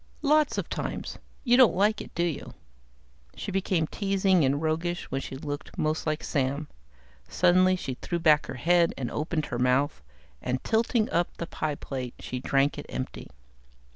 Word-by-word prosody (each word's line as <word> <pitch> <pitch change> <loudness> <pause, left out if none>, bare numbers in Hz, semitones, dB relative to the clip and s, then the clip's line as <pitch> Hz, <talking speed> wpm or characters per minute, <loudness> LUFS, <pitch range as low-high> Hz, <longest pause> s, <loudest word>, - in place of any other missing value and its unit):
"Lots 300 +1 +3
of - - -2
times. - - -4 0.2
You 245 -1 +4
don't 255 -3 +6
like 210 +3 +2
it, - - -11
do 170 - +1
you?" 170 -4 -3 0.8
She 200 - -5
became 185 -3 +1
teasing 195 -1 +2
and 140 +1 +2
roguish, 165 +3 -1
when 135 - -1
she 135 - -7
looked 145 +1 -6
most 155 +1 -1
like 155 0 -1
Sam. 140 +1 -1 0.6
Suddenly 185 +1 +4
she 135 -7 -4
threw 175 - -2
back 155 -3 +4
her 135 - -5
head 170 +6 +3
and 125 -3 -3
opened 155 0 -1
her 120 - -4
mouth, 125 - +2 0.4
and 125 0 -2
tilting 225 0 +2
up 170 +1 0
the 170 - -3
pie 155 -3 -3
plate 130 -3 -6
she 125 - -5
drank 135 +2 +1
it - - -8
empty. 65 0 -5
160 Hz, 170 wpm, -27 LUFS, 140-185 Hz, 0.8 s, don't